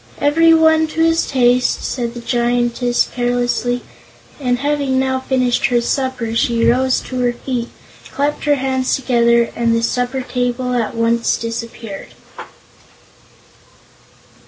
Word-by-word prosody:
"Every 325 +3 +4
one 320 -1 +4
to 320 +1 -3
his 330 0 +2
taste," 250 -1 +2
said 240 -2 -3
the 240 - -7
Giantess 240 0 0
carelessly, 245 0 -1 0.6
and 250 -3 0
having 280 -1 -1
now 260 0 0
finished 255 -1 +1
her 245 -2 +2
supper 250 -2 -2
she 230 -1 +1
rose 260 +1 +2
to 255 - -6
her 245 -1 +1
feet, 240 -1 -4 0.4
clapped 290 +2 -2
her 295 -1 +3
hands 260 -1 0
together, 235 -2 +2
and 230 -1 +1
the 230 - 0
supper 250 +2 -1
table 250 0 -2
at 235 -2 -1
once 230 0 +1
disappeared. 230 -3 -7
245 Hz, 130 wpm, -17 LUFS, 235-265 Hz, 0.6 s, Every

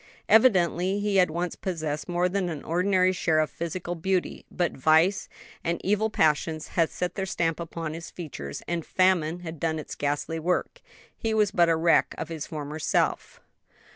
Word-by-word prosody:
Evidently 190 -4 +4
he 205 -1 +1
had 180 -2 +5
once 175 +2 -3
possessed 155 -4 -4
more 175 +1 +1
than 185 -1 -1
an 155 -4 -6
ordinary 185 +2 +2
share 165 -3 +1
of 155 -1 +1
physical 170 +1 -4
beauty, 180 +2 -2
but 175 -2 -1
vice 160 +7 +3 0.3
and 170 +1 -1
evil 210 +3 +1
passions 155 -3 +1
had 165 -2 +1
set 180 0 -3
their 195 - -3
stamp 165 -3 -1
upon 165 -2 -5
his 165 +1 -7
features, 120 - -7
and 170 -1 -2
famine 180 -2 +1
had 165 -2 -7
done 160 0 0
its 155 - -6
ghastly 145 +3 -2
work; 180 - -1 0.3
he 220 -1 -2
was 210 -2 +3
but 175 -3 +3
a 165 - +4
wreck 165 +1 +3
of 160 - -5
his 160 -3 -5
former 150 -1 -6
self. - - 0
170 Hz, 175 wpm, -26 LUFS, 160-185 Hz, 0.3 s, had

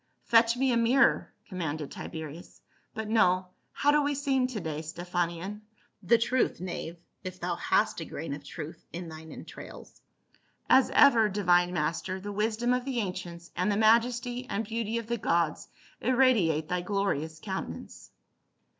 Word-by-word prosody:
" - - -44
Fetch 230 +1 +6
me 265 0 +2
a 235 - +3
mirror," 240 +4 +3 0.2
commanded 160 -6 -4
Tiberius. 160 +1 -8 0.2
" - - -40
But 220 -1 -4
no 185 -4 +3
— - - -44
how 290 - +2
do 300 0 +4
we 290 0 0
seem 270 -2 +1
to 250 -4 -4
day, 155 -4 -4
Stephanion? 175 +4 -3 0.4
The 220 +5 +4
truth, 240 +2 +1
knave 175 -1 -5
— - - -47
if 185 0 -7
thou - - -1
hast - - +1
a - - -4
grain 155 -1 -5
of 145 0 -7
truth 155 +1 -8
in 170 0 -6
thine 160 0 -10
entrails." - - -11 0.7
"As 265 - +5
ever, 235 -7 +6
divine 180 -3 +3
master, 170 +3 -2
the 205 +2 -6
wisdom 220 +4 0
of 250 0 0
the 265 -1 -3
ancients 175 -4 -5
and 185 +3 +1
the 200 - +1
majesty 240 +3 +2
and 220 +3 -1
beauty 225 +1 -2
of 230 - -3
the 235 +1 -2
gods 170 -5 0 0.3
irradiate 220 - +3
thy 180 +1 -1
glorious 175 -5 -1
countenance." 190 - -6
200 Hz, 170 wpm, -29 LUFS, 170-235 Hz, 0.7 s, Fetch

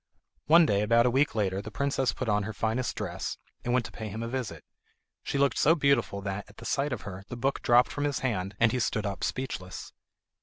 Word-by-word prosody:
One 165 +2 +7
day, 100 -8 +2
about 115 +3 +4
a 125 - +3
week 135 -2 +2
later, 100 -3 0
the 110 - -7
princess 135 +2 0
put 130 - -5
on 105 -1 +2
her 105 +2 -4
finest 115 +3 -1
dress, - - -4 0.3
and 120 - -1
went 125 -1 +2
to - - -8
pay 110 - -6
him 110 +3 -5
a - - -3
visit. 125 -2 -4 0.6
She - - -3
looked 140 -2 +2
so 160 +3 +5
beautiful 140 -9 +2
that, 100 0 -3
at 100 - -18
the 115 - -10
sight 140 +4 0
of 120 -4 -3
her, 95 -1 -7
the 120 - -6
book 135 +3 -1
dropped 120 +1 +4
from 145 - -2
his 145 -2 -1
hand, 100 -5 -1
and 115 -1 +4
he 125 - 0
stood 110 -2 0
up 100 -1 -4
speechless. 95 -8 -4
115 Hz, 235 wpm, -28 LUFS, 105-135 Hz, 0.6 s, One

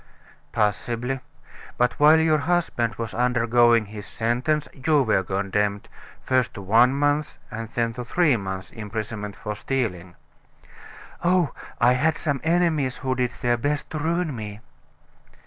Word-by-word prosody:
"Possibly. 120 +4 -1 0.6
But 125 0 +1
while 155 +2 +7
your 160 -1 +3
husband 145 -9 0
was 115 -2 -5
undergoing 120 -1 +3
his 105 0 -9
sentence, 125 +7 0
you 145 +1 +2
were 110 -5 +2
condemned, 100 +2 -1 0.4
first 130 -3 +1
to 105 - -6
one 120 +7 +4
month's 145 +1 0
and 115 -1 -5
then 115 -1 0
to 125 - -5
three 150 +2 +2
months' 95 -3 -5
imprisonment 105 -1 -5
for 105 - -5
stealing." 100 -8 -3 1.1
"Oh, 175 -3 +3 0.3
I 120 +1 +5
had 155 +5 +2
some 145 -4 -2
enemies 160 -6 +1
who 130 -1 -1
did 125 -1 0
their 120 -1 +2
best 145 +4 -2
to 155 - -3
ruin 165 -1 -1
me." 105 -2 -7
120 Hz, 140 wpm, -24 LUFS, 110-145 Hz, 1.1 s, while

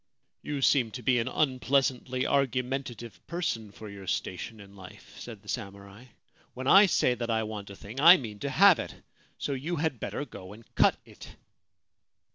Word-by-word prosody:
' - - -50
You 145 -2 -4
seem 130 -5 +3
to 125 - -7
be 125 +1 +3
an 115 - -2
unpleasantly 130 -2 0
argumentative 130 -3 -2
person 155 - -3
for 110 +1 -11
your 100 -2 -10
station 95 +4 -4
in 100 0 -14
life,' 95 -2 -14
said 110 -4 -10
the - - -20
samurai. 100 +3 -7 0.3
* - - -34
When 130 +1 -6
I 195 +8 +7
say 130 -7 +2
that 120 -1 -5
I 110 -1 +1
want 105 -2 -7
a 100 - -9
thing 110 +7 -9
I 170 +4 +9
mean 110 - -8
to 140 - -3
have 185 +7 +6
it: - - -6 0.4
so 140 - -3
you 150 +7 -3
had 155 -6 -2
better 145 - -4
go 95 -7 -11
and 115 +2 -14
cut - - +3
it.' - - -14
125 Hz, 190 wpm, -28 LUFS, 105-140 Hz, 0.4 s, I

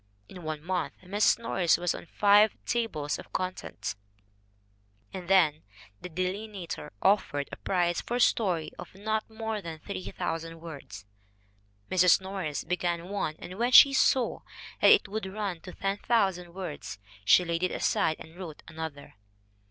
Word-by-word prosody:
In 180 - -11
one 155 -2 -5
month 180 -1 -2
Mrs. 200 +3 +3
Norris 190 -9 +2
was 175 0 0
on - - -9
five 205 +3 +5
tables 220 -12 -1
of - - -12
contents. 180 - -4 1.2
And 185 -2 -6
then 160 -6 +4 0.4
the 180 - -7
Delineator 185 +1 -4
offered 150 -8 +2
a - - -5
prize 175 -2 0
for 240 - -3
a - - 0
story 185 -10 +2
of - - -10
not 215 +3 -2
more 220 -1 -4
than 165 -3 -7
3,000 165 - -5
words. 140 - -9 0.9
Mrs. 180 -2 +6
Norris 190 -6 -4
began 175 0 -2
one, 195 -6 -2
and 185 +3 -9
when 240 +1 +1
she 275 +1 +10
saw 260 -2 +3 0.4
that - - +7
it 435 -2 +6
would 210 -1 -4
run 200 -5 -3
to 180 - -9
10,000 195 -3 0
words, 170 - -6 0.3
she 175 - +6
laid 170 0 -1
it 185 - +2
aside 160 - +1
and 160 +1 -12
wrote 175 -5 -9
another. 160 -3 -7
180 Hz, 150 wpm, -29 LUFS, 160-205 Hz, 1.2 s, she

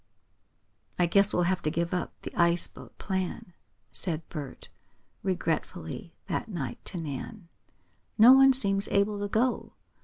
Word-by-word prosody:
"I 175 - +3
guess 200 +4 +3
we'll 175 - +1
have 185 +1 0
to 155 - -1
give 170 +2 -2
up 180 - -2
the - - -7
ice 170 0 +4
boat - - -14
plan," 185 -2 -4 0.4
said 165 -3 -3
Bert, 145 -5 -8 0.5
regretfully 180 0 -3
that - - -3
night 140 - -5
to 185 - -2
Nan. 165 - -7 0.7
"No 230 +3 +9
one 270 0 +7
seems 200 -6 +2
able 200 +1 +1
to 205 - -2
go. 240 +5 -1
185 Hz, 145 wpm, -28 LUFS, 170-205 Hz, 0.7 s, No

